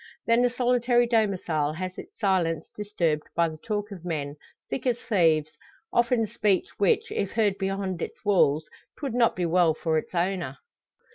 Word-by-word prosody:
Then 230 +1 +4
the 245 - +4
solitary 245 0 +2
domicile 185 -10 +1
has 185 +2 -5
its 390 - -11
silence 170 -6 0
disturbed 170 -7 -1
by 170 -1 +3
the 155 - -9
talk 210 +2 -3
of 185 -4 -9
men, 150 -5 -3 0.3
thick 265 - -3
as 240 -2 +2
thieves 165 -10 +2 0.4
often 235 -1 +3
speech 210 -3 +1
which, 200 -3 +2
if 200 -1 -2
heard 210 -4 +1
beyond 195 -2 -2
its - - -6
walls, 155 -6 +3 0.3
'twould 275 -6 -4
not 235 -1 +3
be 180 - -1
well 170 -2 +3
for 160 -1 0
its 165 - -10
owner. 175 -6 -1
190 Hz, 165 wpm, -26 LUFS, 165-230 Hz, 0.4 s, Then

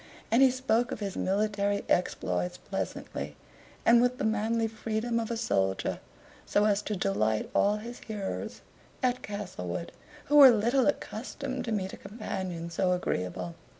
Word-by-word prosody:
And 235 - +5
he 265 - +8
spoke 250 -1 +1
of 265 - -4
his 200 -3 -4
military 205 +1 0
exploits 90 - 0
pleasantly, - - -5 0.5
and 235 0 +7
with 245 +1 +2
the - - -3
manly 220 +1 +1
freedom 225 +1 -2
of 225 - -3
a 235 - -2
soldier, 95 - 0 0.4
so 205 - +2
as 205 -1 +3
to 210 0 -3
delight 110 - 0
all 205 +1 +3
his 235 +3 -8
hearers 210 -3 -5 0.4
at 250 0 +1
Castlewood, 180 - -5 0.3
who 295 - +3
were 275 -2 +11
little 240 +3 +3
accustomed 260 -1 -3
to 230 - -3
meet 190 -3 -1
a - - -7
companion 190 -5 -5
so 180 +2 +2
agreeable. 90 - -2
210 Hz, 150 wpm, -29 LUFS, 185-235 Hz, 0.5 s, were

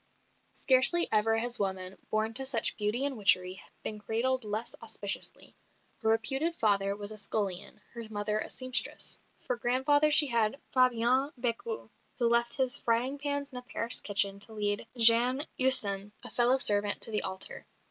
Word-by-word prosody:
Scarcely 270 +7 +6
ever 225 +1 +2
has 240 +2 -1
woman, 190 -1 -4
born 215 +1 -2
to 265 - +1
such 235 -4 +2
beauty 215 +6 0
and 280 -2 -2
witchery, 185 -3 +1 0.2
been 215 - -5
cradled 245 +4 -1
less 215 +2 -4
auspiciously. 215 -3 -4 0.5
Her 220 - 0
reputed 270 +9 +1
father 200 -4 +1
was 205 0 -5
a 215 - -5
scullion, 200 -3 -3
her 235 -1 -7
mother 210 0 -2
a - - -6
sempstress. 255 -1 -2 0.3
For 250 - -2
grandfather 265 +5 +1
she 300 0 +7
had 235 0 -1
Fabien 255 +2 +1
Bécu, 250 - -4 0.3
who 240 - +1
left 235 0 +2
his 265 0 +1
frying 245 +5 -1
pans 285 0 -3
in 250 - -7
a - - -12
Paris 240 -2 -2
kitchen 200 -1 -2
to 215 +2 -9
lead 205 +1 -3
Jeanne 240 +5 +5
Husson, 205 -6 0
a - - -4
fellow 245 +2 +3
servant, 205 -4 +2
to - - 0
the 210 - -1
altar. 190 0 -6
230 Hz, 165 wpm, -29 LUFS, 210-260 Hz, 0.5 s, she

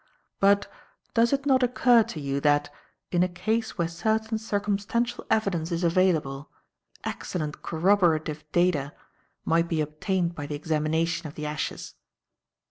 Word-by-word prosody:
But, 200 +1 +4 0.5
does 235 0 +3
it 280 0 0
not 265 -2 +4
occur 245 -1 +5
to 175 - -4
you 140 -1 -2
that, 145 0 +2 0.4
in 175 - +2
a 180 - +4
case 220 +5 -2
where 170 -2 +1
certain 220 +6 -1
circumstantial 215 +3 -1
evidence 195 -7 0
is 170 +1 -1
available, 165 -5 +1 0.5
excellent 155 -4 -4
corroborative 160 -4 +1
data 165 -5 +1 0.5
might 165 +1 +2
be 165 -2 -1
obtained 170 +4 -1
by 145 -3 -6
the 145 - -4
examination 160 +2 -1
of 145 - -11
the 150 - -5
ashes?" 150 0 -4
175 Hz, 135 wpm, -26 LUFS, 155-210 Hz, 0.5 s, occur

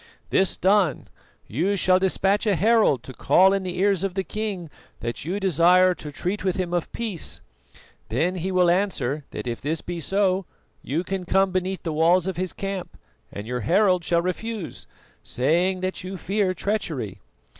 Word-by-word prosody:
This 190 -1 +2
done, 190 -5 +2 0.4
you 175 - 0
shall 185 0 +4
despatch 195 +3 +1
a 205 - +3
herald 210 - +3
to 130 - -9
call 190 +8 +4
in 195 - 0
the 185 -1 -5
ears 195 -1 +2
of 195 -2 -2
the 190 - 0
king 195 -6 -4 0.3
that 120 +4 -4
you 185 +5 -2
desire 185 0 +4
to 150 -4 -8
treat 180 +7 -3
with 190 -2 0
him 180 -2 -2
of 175 -2 -1
peace. 220 -8 -3 0.7
Then 180 +3 +1
he 185 +2 -2
will 180 -2 +4
answer 155 -7 -1
that - - -6
if 120 -1 -4
this 155 +3 -2
be 175 -1 -5
so 190 +1 0 0.3
you 155 +6 -2
can 190 0 -3
come 190 +2 +2
beneath 185 +1 -2
the 165 - -2
walls 165 +3 +3
of 190 -1 -2
his 185 0 -2
camp, 195 -2 -5 0.3
and 100 - -7
your 125 +2 -3
herald 180 - +3
shall 170 0 +1
refuse, 205 +1 -4 0.4
saying 175 +9 +1
that 185 0 -3
you 190 +1 -6
fear 190 +1 0
treachery. 160 - -3
185 Hz, 175 wpm, -24 LUFS, 165-195 Hz, 0.7 s, shall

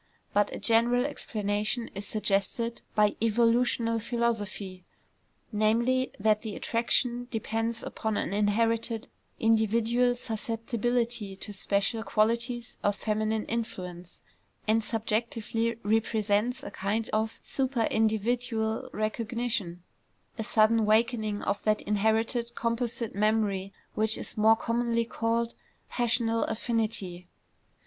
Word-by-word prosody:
But 205 0 +3
a - - -4
general 240 +2 +3
explanation 215 -3 -2
is 200 +1 -5
suggested 215 +3 -1
by 210 -1 +4
evolutional 230 0 +2
philosophy, 210 -5 -2 0.7
namely, 235 +4 +2
that 215 +1 +3
the 220 -3 -5
attraction 240 +1 0
depends 225 0 -2
upon 220 -1 -2
an - - -1
inherited 225 +2 +1 0.3
individual 225 +2 +3
susceptibility 230 -2 -2
to 205 +2 -6
special 200 +3 0
qualities 235 +2 0
of 205 0 +1
feminine 215 0 -1
influence, 180 -6 -5 0.5
and 220 +1 +3
subjectively 225 +1 -1
represents 220 +3 +1
a - - -6
kind 210 +3 -1
of 220 +1 0
superindividual 225 -2 0
recognition, 215 -4 -2 0.5
a 225 - -3
sudden 220 +1 +4
wakening 215 -1 +2
of 200 0 -1
that 215 0 +1
inherited 225 +3 +1
composite 230 -1 -1
memory 205 -2 +1 0.2
which 220 0 +1
is - - -6
more 220 +1 +6
commonly 235 0 0
called 230 0 -1 0.4
"passional 230 -1 +1
affinity." 215 -6 -2
225 Hz, 105 wpm, -29 LUFS, 210-235 Hz, 0.7 s, more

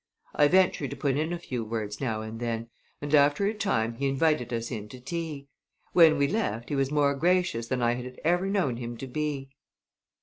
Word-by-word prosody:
I 145 - +5
ventured 180 -5 +3
to - - -6
put 140 -3 0
in 155 +3 -1
a 175 - -2
few 125 -8 -4
words 110 0 -4
now 110 -5 -1
and 110 +1 -7
then, 115 -1 -3 0.3
and 145 +1 -3
after 145 +5 +4
a 210 - +1
time 120 - 0
he 140 - 0
invited 135 -3 +1
us 115 +1 -3
in 105 -3 -5
to 125 - -10
tea. 155 0 -5 0.5
When 160 -3 +7
we 140 0 +3
left 140 - -2
he 145 - -1
was 135 -1 +1
more 145 -1 +2
gracious 175 -6 +1
than 125 -1 -1
I 120 0 +3
had 125 +1 -7
ever 175 +3 +2
known 185 - 0
him 120 -1 -6
to 135 - -6
be. 140 0 -3
140 Hz, 210 wpm, -27 LUFS, 120-160 Hz, 0.5 s, When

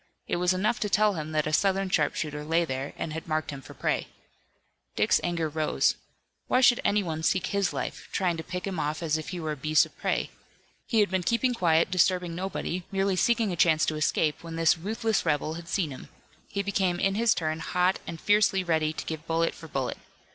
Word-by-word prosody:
It - - 0
was 180 +1 +2
enough 210 +5 0
to 210 - -1
tell 210 +1 +3
him 155 -3 -5
that 155 -1 +1
a 155 - -2
Southern 195 +3 +2
sharpshooter 150 -2 0
lay 165 +3 +1
there 135 -1 -4
and 155 - -4
had 160 +1 -6
marked 155 -1 -1
him 140 -1 -7
for - - -13
prey. - - -1 0.9
Dick's - - +3
anger 170 -2 -1
rose. 155 0 +1 0.5
Why 255 - +3
should 245 -2 +5
anyone 180 -6 0
seek 180 +2 +1
his 200 -2 0
life, - - -5
trying 180 -3 0
to 160 - -5
pick 180 +1 -5
him 190 -4 -3
off 155 +2 -2
as 160 -1 +1
if 155 - -7
he 180 - -5
were 155 -2 -3
a - - -2
beast 155 +2 +3
of - - -17
prey? - - -1 0.6
He 225 -4 +3
had 200 - +1
been 190 -1 +1
keeping 235 +6 +1
quiet, 170 -5 +2
disturbing 180 -1 +2
nobody, 180 0 -3
merely 195 0 +1
seeking 230 +1 +2
a - - -2
chance 160 -2 +4
to 155 - -1
escape, 155 0 0
when 165 -1 -7
this 165 -1 +4
ruthless 215 +4 -1
rebel 155 -1 0
had 165 0 -8
seen 170 -6 0
him. 130 - -10 0.4
He 200 - -3
became 190 -3 0
in 195 +1 +2
his 225 +2 +3
turn 155 -1 -2
hot 180 +2 +1
and 165 - -6
fiercely 205 -1 +3
ready 160 -3 +1
to - - -6
give 160 0 -6
bullet 165 0 +1
for 160 - -11
bullet. 135 -4 -3
170 Hz, 220 wpm, -27 LUFS, 155-195 Hz, 0.9 s, should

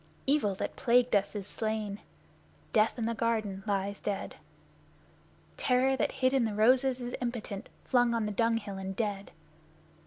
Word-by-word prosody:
Evil 270 -9 +2
that - - -4
plagued 245 -1 +3
us 200 +1 +1
is 200 -2 -4
slain, 215 -1 -3 0.7
Death 215 +2 +3
in 230 - -1
the 230 - 0
garden 220 -4 -1
lies 200 0 -1
dead. 200 -1 -3 1.2
Terror 260 +1 +3
that - - 0
hid 260 0 +1
in 265 -3 +3
the 220 -2 -1
roses 255 +4 +3
is 245 0 -5
impotent 235 -5 -4
flung 245 -2 +3
on 225 -2 0
the 210 - -2
dung 230 +2 +2
hill 200 -3 -6
and 190 0 -5
dead! 205 -2 -2
225 Hz, 160 wpm, -30 LUFS, 205-245 Hz, 1.2 s, plagued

